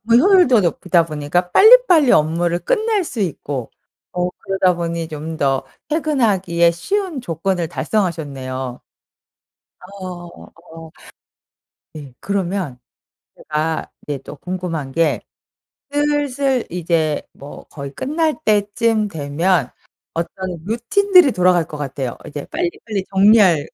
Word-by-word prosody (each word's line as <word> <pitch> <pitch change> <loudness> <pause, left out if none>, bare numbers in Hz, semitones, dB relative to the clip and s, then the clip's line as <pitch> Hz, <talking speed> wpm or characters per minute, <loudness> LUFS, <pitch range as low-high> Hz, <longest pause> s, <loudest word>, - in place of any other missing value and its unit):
효율도 295 - +5
높이다 175 -1 +1
보니까 160 +3 -2
빨리빨리 405 - +7
업무를 170 +3 +2
끝낼 440 - 0
수 245 -8 -6
있고 145 - -3 0.4
어 180 0 0
그러다 190 -2 +1
보니 170 -1 -3
좀 155 +1 -6
더 135 -2 +1 0.3
퇴근하기에 205 - +2
쉬운 345 - -3
조건을 170 -2 -2
달성하셨네요. 140 - -3 1.2
어. 170 -2 -10 1.0
네. 145 -4 -10
그러면 190 -7 -2 0.6
제가 155 +1 -3
이제 145 -2 -4
또 145 - -10
궁금한 170 -4 -5
게 165 +2 +1 0.7
슬슬 285 -3 0
이제 165 -3 0
뭐 140 +1 -11
거의 140 -2 -9
끝날 310 - -1
때쯤 215 +1 +1
되면 160 -1 0 0.4
어떤 175 +1 -4
루틴들이 275 - +4
돌아갈 180 -2 +3
것 150 - -8
같아요. 135 -3 -4
이제 145 -1 -6
빨리빨리 310 - -3
정리할 190 -6 +5
180 Hz, 240 characters per minute, -19 LUFS, 155-230 Hz, 1.2 s, 빨리빨리